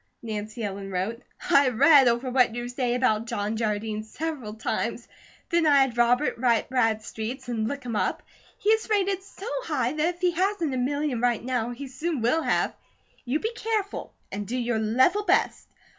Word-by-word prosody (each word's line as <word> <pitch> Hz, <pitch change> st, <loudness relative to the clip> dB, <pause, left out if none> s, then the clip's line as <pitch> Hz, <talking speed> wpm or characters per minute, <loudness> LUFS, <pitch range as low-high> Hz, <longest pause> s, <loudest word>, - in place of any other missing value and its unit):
Nancy 215 Hz, 0 st, -5 dB
Ellen 195 Hz, -1 st, -4 dB
wrote: 195 Hz, +6 st, -3 dB, 0.3 s
I 280 Hz, -3 st, +6 dB
have 250 Hz, -3 st, -1 dB
read 280 Hz, -1 st, +7 dB
over 240 Hz, +2 st, +1 dB
what 250 Hz, -3 st, +3 dB
you 240 Hz, 0 st, -3 dB
say 245 Hz, -1 st, -1 dB
about 230 Hz, -3 st, +1 dB
John 205 Hz, 0 st, -2 dB
Jardine 215 Hz, -1 st, -2 dB
several 255 Hz, -2 st, -5 dB
times. 220 Hz, -, -3 dB, 0.4 s
Then 340 Hz, -2 st, +3 dB
I 285 Hz, -2 st, +6 dB
had 265 Hz, -3 st, +1 dB
Robert 240 Hz, +3 st, +2 dB
write 240 Hz, -1 st, +2 dB
Bradstreet's 225 Hz, +1 st, -1 dB
and 225 Hz, -3 st, -1 dB
look 280 Hz, +2 st, -4 dB
him 235 Hz, -2 st, -3 dB
up. -, -, -1 dB, 0.3 s
He 420 Hz, -, -1 dB
is 445 Hz, 0 st, +1 dB
rated 395 Hz, -2 st, +1 dB
so 395 Hz, 0 st, -12 dB, 0.2 s
high 265 Hz, -, -1 dB
that 315 Hz, +3 st, 0 dB
if 350 Hz, -, -25 dB
he 360 Hz, -1 st, +3 dB
hasn't 355 Hz, -4 st, 0 dB
a -, -, -1 dB
million 275 Hz, -1 st, -1 dB
right 240 Hz, -2 st, +1 dB
now, 245 Hz, -2 st, -1 dB
he 270 Hz, +3 st, -6 dB
soon 310 Hz, +3 st, -3 dB
will 280 Hz, +8 st, +2 dB
have. -, -, +1 dB, 0.5 s
You 260 Hz, +5 st, 0 dB
be 445 Hz, +6 st, -3 dB
careful, 440 Hz, -3 st, -3 dB, 0.2 s
and 205 Hz, 0 st, -4 dB
do 250 Hz, -, -2 dB
your 240 Hz, -2 st, 0 dB
level 255 Hz, -, +3 dB
best. -, -, +1 dB
250 Hz, 190 wpm, -26 LUFS, 225-305 Hz, 0.5 s, read